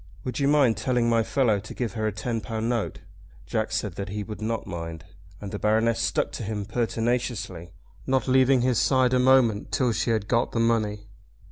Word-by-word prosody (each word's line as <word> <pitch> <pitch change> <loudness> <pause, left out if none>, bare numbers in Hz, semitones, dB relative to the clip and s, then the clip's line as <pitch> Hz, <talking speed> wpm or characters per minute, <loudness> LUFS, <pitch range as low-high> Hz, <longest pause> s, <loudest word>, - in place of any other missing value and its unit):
Would 125 0 -4
you 140 - +2
mind 140 -6 +4
telling 125 -2 +1
my 115 -1 +3
fellow 115 -3 +1
to 105 - -9
give 115 -6 -3
her 110 -1 -1
a - - 0
ten 115 +3 -3
pound 110 +1 -3
note?" 120 -3 -2 0.4
Jack - - -2
said - - -2
that 100 -1 -4
he 105 +1 -4
would 105 +1 -8
not 115 +1 -2
mind; 85 -2 -6 0.3
and 100 -2 -7
the 105 - -4
Baroness 110 +2 +2
stuck - - 0
to - - -6
him 105 -1 -3
pertinaciously, 115 -6 -2 0.4
not 130 0 +1
leaving 130 0 +4
his 125 -2 +2
side 130 -2 +3
a 125 - +3
moment 125 -5 +3
till 125 -3 +1
she 115 +2 -1
had 110 -3 0
got 115 +2 +1
the 115 - 0
money. 110 -3 0
115 Hz, 205 wpm, -25 LUFS, 105-125 Hz, 0.4 s, mind